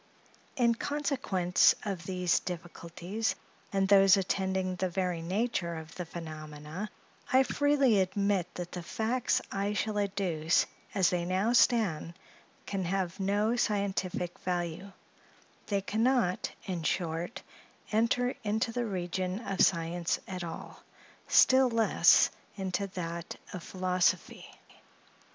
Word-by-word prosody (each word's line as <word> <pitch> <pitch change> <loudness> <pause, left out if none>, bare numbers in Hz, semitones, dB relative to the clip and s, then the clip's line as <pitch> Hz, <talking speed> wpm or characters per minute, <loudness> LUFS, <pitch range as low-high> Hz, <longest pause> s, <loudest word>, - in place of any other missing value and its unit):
In 240 -4 +3
consequence 245 -10 +2
of 185 -4 -4
these 180 -2 +1
difficulties 175 +4 -4 0.4
and 195 -1 +1
those 195 -1 +7
attending 190 -1 -1
the 185 0 -1
very 180 -2 -1
nature 185 -1 -1
of 160 0 -8
the 180 -2 -6
phenomena, 155 +3 -7 0.4
I 260 +1 +6
freely 275 -6 +3
admit 190 -1 0
that 175 -1 -5
the 180 - -5
facts 225 +7 0
I 200 +1 -1
shall 210 0 -1
adduce, 185 -5 +1 0.3
as 190 -3 +3
they 175 -1 0
now 190 +6 +1
stand, 195 -10 +2 0.5
can 195 -2 -2
have 185 +1 -2
no 205 +4 +1
scientific 195 -5 -1
value; 175 +1 -3 0.8
they 200 -1 0
can 215 +3 -2
not 240 -7 +2 0.2
in 180 -4 -3
short, 170 +5 -2 0.5
enter 235 +3 +2
into 220 +2 0
the 240 0 -2
region 185 0 -2
of 195 -1 -1
science 170 0 +1
at 185 -2 -5
all, 165 - -8 0.5
still 260 0 +6
less 230 -2 +5 0.3
into 190 +1 -2
that 170 -3 -5 0.2
of 180 - -5
philosophy. 185 0 0
190 Hz, 120 wpm, -30 LUFS, 175-210 Hz, 0.8 s, those